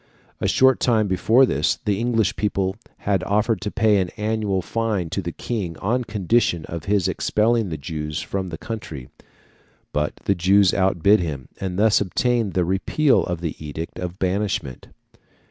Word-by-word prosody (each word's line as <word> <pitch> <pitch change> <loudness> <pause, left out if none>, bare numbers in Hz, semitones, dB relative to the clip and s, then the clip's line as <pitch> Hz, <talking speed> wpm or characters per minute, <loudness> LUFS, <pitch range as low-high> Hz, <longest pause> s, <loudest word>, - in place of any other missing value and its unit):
A - - 0
short 130 0 +4
time 110 -4 +2
before 110 +7 +4
this, - - +1
the 100 -2 +1
English 115 -5 +1
people 100 -2 -1 0.3
had 100 -3 +1
offered 105 +1 +1
to 105 - -2
pay 105 0 +3
an 95 -2 0
annual 105 -3 -1
fine 105 -5 -2
to 100 - -1
the 85 -1 -4
King 90 -5 -4
on 120 +5 -1
condition 105 -4 +1
of 85 -2 -7
his 100 -3 +1
expelling 110 -1 +1
the 80 - -4
Jews 75 +2 -4
from 95 -2 -4
the 80 - -6
country; 80 - -7 0.8
but 75 0 -1
the 100 - +3
Jews 95 +2 +4
outbid 95 +2 +3
them, 75 -7 -4
and 95 -2 -3
thus 105 0 +4
obtained 115 +2 0
the 90 -2 +2
repeal 95 - +2
of 90 -2 -4
the 80 -3 -3
edict 75 +2 -6
of 90 0 -5
banishment. 95 -9 -2
100 Hz, 165 wpm, -22 LUFS, 85-110 Hz, 0.8 s, short